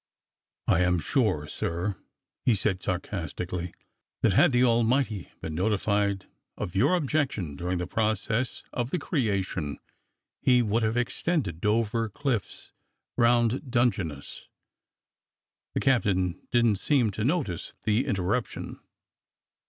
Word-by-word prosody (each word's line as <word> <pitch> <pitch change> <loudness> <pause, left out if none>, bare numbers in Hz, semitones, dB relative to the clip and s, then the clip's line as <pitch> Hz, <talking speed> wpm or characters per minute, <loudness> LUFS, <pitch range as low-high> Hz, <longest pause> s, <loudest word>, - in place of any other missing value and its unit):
"I - - +4
am 90 0 +3
sure, 90 - +1
sir," 85 +6 -2 0.5
he 120 - +4
said 95 -2 0
sarcastically, 90 -1 -3 0.5
"that 110 - +4
had 165 - +5
the 125 0 +4
Almighty 115 -3 +2
been 80 - -4
notified 100 +1 +1 0.3
of 90 - -4
your 100 - +4
objection 135 - -1
during 90 +4 -2
the 90 - -2
process 110 +4 -1
of 120 0 -1
the 180 - 0
creation 100 - -1 0.6
he 125 -2 +4
would 110 +1 +1
have 110 +1 +1
extended 120 - -1
Dover 115 +1 +1
Cliffs 120 -2 -3 0.4
round 120 +3 +2
Dungeness." 100 - -1 1.3
The - - +2
captain 95 -8 +1
didn't 120 -4 +3
seem 125 -1 +2
to 105 +2 -3
notice 130 - -1
the 110 +5 +1
interruption. 100 +5 -2
110 Hz, 115 wpm, -27 LUFS, 90-120 Hz, 1.3 s, had